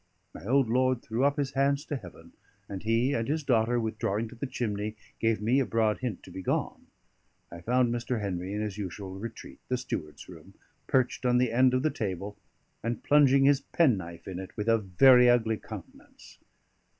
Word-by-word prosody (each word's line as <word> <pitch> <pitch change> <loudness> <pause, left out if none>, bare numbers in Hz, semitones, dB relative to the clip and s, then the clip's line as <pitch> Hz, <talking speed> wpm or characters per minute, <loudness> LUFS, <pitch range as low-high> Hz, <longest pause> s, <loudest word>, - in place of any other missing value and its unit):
My - - -11
old 135 0 +3
lord 130 +1 +1
threw 115 +4 -2
up 140 +1 +2
his 140 -2 -1
hands 140 +2 +1
to 150 - -3
Heaven, 85 -8 -11 0.3
and 95 -2 -6
he 115 +5 +1
and 115 -2 -1
his 155 +2 -1
daughter, 120 -2 +2
withdrawing 110 -1 -2
to 120 - -12
the 130 +4 -4
chimney, 105 -3 -3 0.2
gave 115 -2 0
me 125 +5 +3
a 135 - +1
broad 110 -2 +1
hint 120 -7 -4
to - - -12
be 95 - -7
gone. - - -2 0.6
I 85 - -9
found 120 +4 +2
Mr. 120 0 -2
Henry 95 -2 -3
in 105 +1 -2
his 105 -1 -4
usual 95 0 -6
retreat, 115 +1 -9
the 130 - 0
steward's 75 -10 -6
room, - - -14 0.3
perched 130 0 +1
on 125 -1 +3
the 125 -2 +2
end 130 +2 +4
of 130 - 0
the 155 - +2
table, 100 -1 -4 0.5
and 115 0 -3
plunging 140 -2 +5
his 140 0 +4
penknife 95 - 0
in 95 -2 -5
it 95 - -9
with 105 +1 -3
a 115 0 +4
very 125 +6 +6
ugly 115 -2 +2
countenance. - - -12
115 Hz, 195 wpm, -28 LUFS, 105-130 Hz, 0.6 s, very